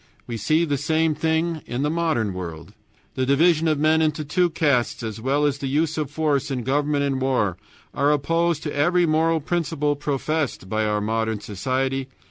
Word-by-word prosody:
We 120 Hz, -, -5 dB
see 155 Hz, +10 st, +2 dB
the 145 Hz, -3 st, -1 dB
same 160 Hz, +1 st, +1 dB
thing 160 Hz, +1 st, 0 dB
in 125 Hz, +4 st, -2 dB
our 150 Hz, -, 0 dB
modern 160 Hz, -, 0 dB
world. 85 Hz, -3 st, -7 dB, 0.4 s
The 130 Hz, -, -1 dB
division 160 Hz, +4 st, +3 dB
of 155 Hz, -2 st, +2 dB
men 155 Hz, +2 st, +3 dB
into 155 Hz, -1 st, 0 dB
two 175 Hz, +4 st, +2 dB
castes, 145 Hz, -9 st, 0 dB
as 110 Hz, 0 st, -5 dB
well 140 Hz, +4 st, +1 dB
as 140 Hz, -1 st, 0 dB
the 140 Hz, -, -3 dB
use 155 Hz, +3 st, 0 dB
of 150 Hz, -3 st, -2 dB
force 150 Hz, -2 st, 0 dB
in 130 Hz, -3 st, -2 dB
government 145 Hz, +2 st, +1 dB
and 135 Hz, -2 st, -1 dB
war, 125 Hz, -9 st, +1 dB, 0.4 s
are 140 Hz, +1 st, +2 dB
opposed 165 Hz, +2 st, +1 dB
to 150 Hz, -, -3 dB
every 175 Hz, +5 st, +3 dB
moral 160 Hz, +1 st, +2 dB
principle 155 Hz, -2 st, -1 dB
professed 145 Hz, -5 st, -2 dB
by 110 Hz, +2 st, 0 dB
our 105 Hz, 0 st, 0 dB
modern 110 Hz, 0 st, -1 dB
society. 130 Hz, +6 st, -2 dB
145 Hz, 185 wpm, -23 LUFS, 130-160 Hz, 0.4 s, division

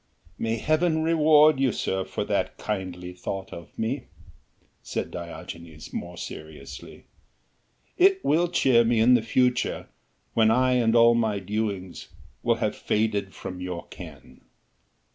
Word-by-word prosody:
"May 115 Hz, 0 st, 0 dB
Heaven 160 Hz, +5 st, +1 dB
reward 155 Hz, -2 st, +5 dB
you, 135 Hz, -2 st, +3 dB
sir, 95 Hz, -2 st, -2 dB
for -, -, -3 dB
that -, -, -1 dB
kindly 90 Hz, -3 st, -4 dB
thought 95 Hz, +1 st, -6 dB
of 85 Hz, -, -11 dB
me," 125 Hz, +4 st, -2 dB, 0.8 s
said -, -, -4 dB
Diogenes 85 Hz, -2 st, -9 dB
more 85 Hz, 0 st, -5 dB
seriously, 75 Hz, -5 st, -9 dB, 0.9 s
"it 385 Hz, +1 st, +4 dB
will 170 Hz, +3 st, +3 dB
cheer 130 Hz, -8 st, +4 dB
me 115 Hz, 0 st, +2 dB
in 120 Hz, +3 st, +6 dB
the 120 Hz, -, +5 dB
future, 125 Hz, +2 st, 0 dB, 0.4 s
when 110 Hz, -1 st, +4 dB
I 130 Hz, +3 st, +3 dB
and 120 Hz, -2 st, +3 dB
all 115 Hz, 0 st, +7 dB
my 110 Hz, -3 st, +1 dB
doings 100 Hz, -2 st, -4 dB, 0.3 s
will -, -, +2 dB
have -, -, -1 dB
faded 105 Hz, -3 st, -1 dB
from 90 Hz, -1 st, -7 dB
your 90 Hz, -2 st, -5 dB
ken." -, -, -12 dB
110 Hz, 135 wpm, -26 LUFS, 95-130 Hz, 0.9 s, all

